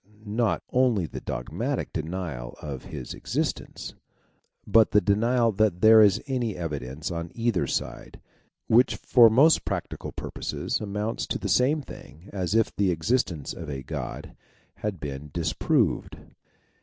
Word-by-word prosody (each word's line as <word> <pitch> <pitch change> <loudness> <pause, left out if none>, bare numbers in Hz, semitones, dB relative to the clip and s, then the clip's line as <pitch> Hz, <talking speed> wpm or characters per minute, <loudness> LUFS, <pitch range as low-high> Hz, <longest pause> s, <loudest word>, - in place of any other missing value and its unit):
not 110 +1 0
only 125 -8 +2
the 75 - -7
dogmatic 105 - -3
denial 80 -7 -4
of 70 -4 -7
his - - -7
existence, - - -3 0.7
but 110 -2 +5
the 105 - +5
denial 115 +3 +2
that 105 -3 +1
there 110 0 +8
is 105 0 +5
any 125 -6 -2
evidence 75 -2 -4
on 85 0 -4
either 115 -5 0
side, - - -4 0.5
which 120 +3 +4
for 120 -3 +6
most 140 +9 +5
practical - - -4
purposes - - -4
amounts 105 +2 -3
to - - -1
the - - -4
same 145 +4 +2
thing 85 - -13
as 95 0 -1
if 115 -1 +2
the 100 -2 +2
existence 85 - 0
of - - -8
a 70 -2 -5
God 65 - -6 0.4
had 105 -4 -4
been 75 0 -6
disproved. - - 0
105 Hz, 140 wpm, -26 LUFS, 80-115 Hz, 0.7 s, there